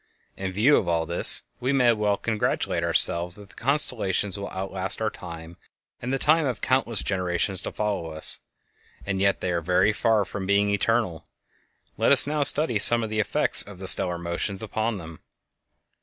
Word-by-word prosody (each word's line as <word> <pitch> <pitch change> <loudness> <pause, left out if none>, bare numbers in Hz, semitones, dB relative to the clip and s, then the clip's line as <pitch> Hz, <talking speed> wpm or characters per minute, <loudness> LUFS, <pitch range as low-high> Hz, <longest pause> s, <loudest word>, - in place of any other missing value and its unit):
In 95 -1 -6
view 115 +10 +2
of 90 - -3
all 85 -1 -1
this, 85 +2 +5 0.2
we 130 +2 -2
may 125 -4 +2
well 105 -2 -1
congratulate 110 0 -3
ourselves 85 +1 +2
that 105 -2 -13
the - - -19
constellations 110 -8 +2
will 100 0 -7
outlast 95 0 -4
our 110 -1 -2
time 85 -1 -11 0.4
and 125 - -5
the 135 - -1
time 155 +2 +1
of 125 - -4
countless 120 -4 -1
generations 90 0 -3
to - - -6
follow 100 -6 -4
us; 80 0 +1 0.7
and 95 -1 -4
yet 100 0 0
they 90 - -3
are 85 -1 -2
very 90 +5 +1
far 110 -2 0
from 95 0 -7
being 100 +1 +1
eternal. 100 -5 -2 0.7
Let - - +1
us - - +9
now 150 +1 -3
study 140 -5 +5
some 120 +2 +5
of 110 - -6
the 110 - -3
effects 105 - 0
of 100 -2 -10
the 95 - -10
stellar 90 -1 +1
motions 85 +4 -4
upon 110 0 -4
them. 80 -3 -12
100 Hz, 185 wpm, -23 LUFS, 90-115 Hz, 0.7 s, us